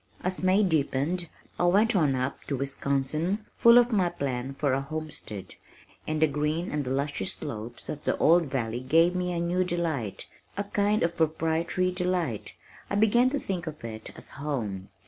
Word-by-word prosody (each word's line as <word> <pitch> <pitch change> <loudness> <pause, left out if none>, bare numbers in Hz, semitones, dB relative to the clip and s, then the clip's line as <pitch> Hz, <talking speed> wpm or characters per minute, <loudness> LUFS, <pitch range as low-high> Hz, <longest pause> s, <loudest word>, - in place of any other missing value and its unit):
As 185 +1 0
May 185 +3 +4
deepened 160 0 0 0.3
I 175 - +3
went 205 +6 +4
on 150 -7 +3
up 130 +2 -2
to 140 - -2
Wisconsin, 140 - -1
full 235 +1 +7
of 245 0 +5
my 190 -5 +3
plan 135 -5 -3
for 140 -2 +1
a 135 - +1
homestead, 150 -9 -6 0.5
and 155 0 -1
the 160 - +6
green 150 +4 -1
and 150 -3 -2
luscious 135 -6 -1
slopes 115 +2 -7
of 150 - -5
the - - 0
old 170 +1 +5
valley 120 -4 -2
gave 165 +7 +4
me 180 0 -1
a 175 - -1
new 175 +2 +1
delight, 165 - -2 0.3
a 200 - 0
kind 205 +1 +1
of 170 0 0
proprietary 165 +3 +1
delight. 180 - -2 0.4
I - - -1
began 220 +4 +4
to 285 - -1
think 180 -7 -4
of 155 -4 -7
it 110 -1 -7
as - - -8
home. 110 -10 -3
160 Hz, 175 wpm, -28 LUFS, 135-180 Hz, 0.5 s, full